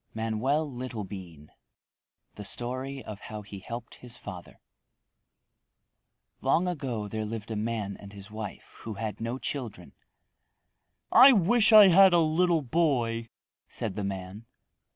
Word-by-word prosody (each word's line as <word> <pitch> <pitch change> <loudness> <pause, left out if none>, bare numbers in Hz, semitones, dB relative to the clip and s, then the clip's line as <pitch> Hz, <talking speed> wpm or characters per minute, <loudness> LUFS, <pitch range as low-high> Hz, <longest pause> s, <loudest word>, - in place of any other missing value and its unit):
MANOEL 115 +8 0
LITTLEBEAN 100 - -8 0.8
The 105 - -9
Story 130 +5 -4
of 105 -2 -8
How 105 0 -8
He 100 0 -9
Helped 115 +4 -8
His 125 -1 -9
Father 90 -4 -10 1.8
Long 180 +2 +2
ago 130 -11 -3
there 110 +1 -4
lived 110 0 -6
a - - -2
man 105 -2 -3
and 100 - -12
his 100 +1 -11
wife 110 -2 -8
who 110 -2 -7
had 110 +1 -5
no 115 +3 -3
children. 115 -10 -6 1.2
"I 260 +3 +9
wish 215 +3 +4
I 210 -3 +10
had 190 +1 +7
a - - +6
little 165 0 +2
boy," 120 -6 0 0.4
said 105 -4 -4
the 105 - -3
man. 95 +3 -6
115 Hz, 130 wpm, -28 LUFS, 105-140 Hz, 1.8 s, I